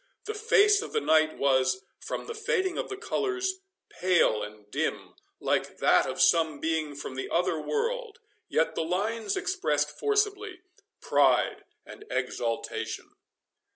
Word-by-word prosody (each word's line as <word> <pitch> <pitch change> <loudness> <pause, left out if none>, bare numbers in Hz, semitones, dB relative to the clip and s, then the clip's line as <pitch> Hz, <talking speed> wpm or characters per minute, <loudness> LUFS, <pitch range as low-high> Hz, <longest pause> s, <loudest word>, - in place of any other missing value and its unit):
The 435 - -3
face 420 -1 +4
of 445 - -8
the 450 - +2
knight 155 - +3
was, 135 +6 +2 0.2
from - - -5
the 460 - -5
fading 380 -4 0
of - - -3
the 400 - -5
colours, 380 -2 -2 0.3
pale 175 -12 +2
and 105 0 -8
dim, - - -2 0.3
like - - -1
that - - +4
of - - -5
some 160 -3 +4
being 160 -2 -1
from 140 - -6
the 130 - -5
other 170 -2 +1
world, 465 - -2 0.3
yet 160 - +1
the - - -2
lines 220 - -1
expressed 380 +1 0
forcibly 415 -2 -1 0.4
pride - - +2 0.2
and 410 - -11
exultation. 115 -1 -3
345 Hz, 140 wpm, -28 LUFS, -, 0.4 s, face